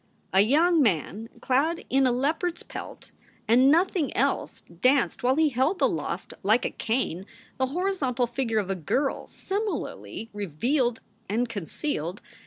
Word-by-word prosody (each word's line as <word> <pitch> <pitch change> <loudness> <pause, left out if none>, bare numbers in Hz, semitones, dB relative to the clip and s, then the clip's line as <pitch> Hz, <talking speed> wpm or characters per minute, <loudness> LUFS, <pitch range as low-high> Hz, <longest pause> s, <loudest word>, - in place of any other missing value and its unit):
A 190 - +6
young 315 - +4
man 210 - 0
clad 300 +6 +1
in 265 0 +3
a - - +3
leopard 315 +7 0
s - - -13
pelt - - -9 0.4
and 250 +4 +5
nothing 335 -2 +2
else 275 +3 0
danced 245 +10 +1
while 255 +2 +3
he 315 0 +3
held 275 +8 +1
aloft - - -1
like 220 +5 +3
a - - -1
cane 220 -6 -2 0.3
the 260 - +2
horizontal 280 -6 0
figure 240 -2 -2
of 195 -2 0
a - - 0
girl 265 - -1
similarly 400 - -4
revealed 230 - 0 0.3
and 235 +4 +1
concealed. 200 - -3
255 Hz, 145 wpm, -26 LUFS, 220-300 Hz, 0.4 s, A